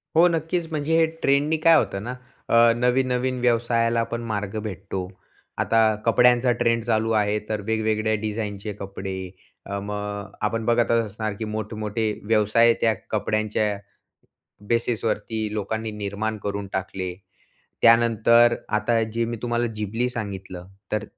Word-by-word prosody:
हो 170 +2 +7
नक्कीच, 165 0 -1
म्हणजे 155 +1 0
हे 165 - +5 0.2
ट्रेंडने 145 +3 +3
काय 165 0 +8
होतं 100 -6 -1
ना, 125 +3 -5 0.3
अ, 115 0 +6
नवीन-नवीन 125 +1 +1
व्यवसायाला 115 -1 +2
पण 115 - -2
मार्ग 105 0 -3
भेटतो. 95 -2 -5 0.5
आता 115 - +2 0.3
कपड्यांचा 125 +1 +4
ट्रेंड 115 -1 +2
चालू 110 -1 +1
आहे, 105 0 +1
तर 105 -1 -2
वेगवेगळ्या 110 0 0
डिझाइनचे 105 -1 -4
कपडे 95 -1 -5 0.5
अ, 100 - -4
मग 105 0 -5
आपण 110 +1 -1
बघतच 115 0 +3
असणार 110 0 -4
की 110 - -2
मोठे-मोठे 110 0 -3 0.2
व्यवसाय 110 +2 +4
त्या 115 -1 +4 0.2
कपड्यांच्या 110 0 0 1.0
बेसिसवरती 110 -2 -1
लोकांनी 110 +2 -3
निर्माण 105 +1 -3
करून 100 0 -3
टाकले. 95 -1 -3 0.7
त्यानंतर 115 0 +5 0.2
आता 115 +1 +1
जे 115 0 +1
मी 115 +1 -3
तुम्हाला 120 0 0
जिबली 110 +4 -1
सांगितलं, 95 -6 -6 0.3
तर 105 -1 0
110 Hz, 130 wpm, -24 LUFS, 105-120 Hz, 1.0 s, काय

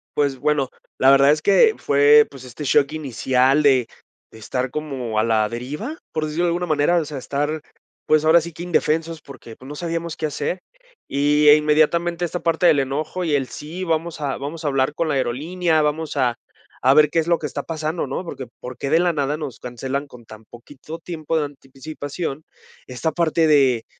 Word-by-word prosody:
Pues, 140 -3 0
bueno, 145 -3 +1 0.3
la 135 +1 +5
verdad 140 +1 +6
es 155 +1 +1
que 435 - +5
fue, 145 +1 +5
pues, 135 -2 -12
este 125 +4 -9
shock 140 +1 +3
inicial 135 -1 +1
de 130 -4 +4 0.4
de 110 - -15
estar 125 +3 -3
como 130 -8 -3
a - - +3
la 110 -2 +2
deriva, 150 - -6
por 155 -1 -2
decirlo 155 +3 -2
de - - +2
alguna 175 +1 -1
manera, 155 +2 +2
o 160 - 0
sea, 145 -2 -7
estar, 145 +4 -2 0.4
pues, 155 0 +3
ahora 165 +1 +6
sí 170 +1 -7
que 165 - -11
indefensos, 165 -2 0
porque, 120 -5 -12
pues, 130 +2 -13
no 150 - -7
sabíamos 170 0 -4
qué 155 - -2
hacer. 150 +4 -3 0.5
Y, 145 +2 +2
eh, 145 - +10
inmediatamente 165 +3 +2
esta 175 +1 -4
parte 165 +1 +1
del 145 -4 +5
enojo 155 +7 -3
y 155 -4 +1
el 135 -2 -1
sí, 170 +5 -7
vamos 165 0 -2
a 140 -2 -2
vamos 150 +3 -6
a - - +1
hablar 135 +1 +1
con 165 - -1
la 150 - 0
aerolínea, 155 +6 0
vamos 150 0 -2
a 125 -3 +1 0.5
a 130 +2 +5
ver 150 0 +5
qué 165 - +1
es 160 - -1
lo 170 -1 +2
que 150 - -3
está 140 +1 -5
pasando 160 0 -3
¿no? 135 +7 -4
¿Por - - -6
qué 130 -3 -7
por 125 0 -8
qué, 140 - -4
de 165 - +4
la 175 -1 +2
nada 145 0 -1
nos 145 -6 -7
cancelan 130 +3 -4
con 120 -3 -15
tan 110 0 -13
poquito 140 +8 -11
tiempo 165 -1 -3
de 150 - 0
anticipación 145 +2 -7 0.4
esta 130 +6 -2
parte 165 -1 +2
de 135 -6 +3
150 Hz, 210 wpm, -21 LUFS, 135-160 Hz, 0.5 s, eh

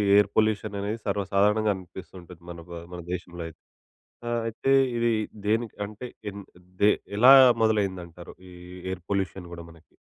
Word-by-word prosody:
Air 105 -1 +5
పొల్యూషననేది 105 -1 0
సర్వసాధారణంగా 100 +2 +2
అనిపిస్తూ 95 0 -11
ఉంటుంది 85 -1 -14
మన 85 -1 -8
బ - - -12 0.2
మన 90 - -6
దేశంలో 90 -1 -5
అయితే. 80 -1 -13 0.7
ఆహ్, 120 0 0
అయితే 115 +4 -2 0.3
ఇదీ 115 0 +2 0.3
దేనికి 110 +1 0
అంటే, 105 +4 -9 0.2
ఎంద్ 100 0 -10 0.4
దే 105 - +7 0.3
ఎలా 125 +4 +9 0.3
మొదలైందంటారు, 95 -6 -1 0.2
ఈ - - -14 0.4
ఎయిర్ 95 -2 -5
పొల్యూషన్ 95 -2 -2
గూడా 85 -1 -8
మనకి? 80 0 -19
100 Hz, 145 wpm, -26 LUFS, 90-110 Hz, 0.7 s, ఎలా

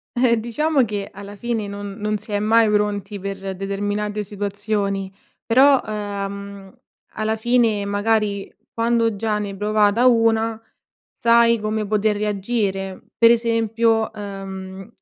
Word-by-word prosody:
Eh 240 -1 +3
diciamo 275 +5 +1
che 205 -2 -4
alla 200 +1 -9
fine 225 -1 -3
non 200 0 -6
non 210 0 -1
si 210 - -11
è 205 - +1
mai 220 +1 +4
pronti 205 -1 -1
per 195 0 -5
determinate 205 +2 -2
situazioni 200 -1 -3 0.3
però, 265 +3 +5
ehm, 200 -2 -6 0.4
alla 215 +1 -1
fine 225 -2 +2
magari, 205 0 0 0.2
quando 230 -1 +1
già 210 +1 -1
ne 205 -1 -3
hai 195 - -8
provata 210 +3 +2
una, 225 -2 +3 0.5
sai 235 0 +4
come 215 0 -2
poter 210 0 +1
reagire. 200 -2 -2 0.2
Per 230 0 +7
esempio, 230 -1 +1
ehm, 195 -2 -8
210 Hz, 130 wpm, -21 LUFS, 200-225 Hz, 0.5 s, Per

